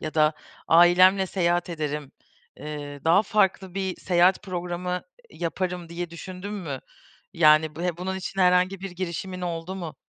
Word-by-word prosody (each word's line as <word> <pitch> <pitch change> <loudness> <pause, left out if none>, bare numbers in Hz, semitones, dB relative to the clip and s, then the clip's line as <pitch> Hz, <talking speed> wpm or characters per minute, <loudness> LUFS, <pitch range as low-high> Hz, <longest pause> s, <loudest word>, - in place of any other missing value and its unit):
ya 155 - -5
da 155 -1 +4 0.4
ailemle 185 +3 +6
seyahat 175 -1 0
ederim, 150 -3 -4 0.4
eee, 145 -1 -7
daha 170 +5 +5
farklı 190 -3 +1
bir 190 -1 -2
seyahat 180 +1 +3
programı, 180 -1 -3 0.3
iii, - - -13
yaparım 180 +1 -2
diye 170 0 -5
düşündüm 185 +4 -7
mü? 155 -10 -5 0.5
Yani 155 -1 +4
b 170 - -5
ve 175 -2 -1
bunun 190 +2 -3
için 190 +1 -4
herhangi 180 +1 +3
bir 195 -1 -5
girişimin 185 +1 -5
oldu 170 +1 -4
mu? 170 -5 -7
175 Hz, 155 wpm, -25 LUFS, 165-185 Hz, 0.5 s, ailemle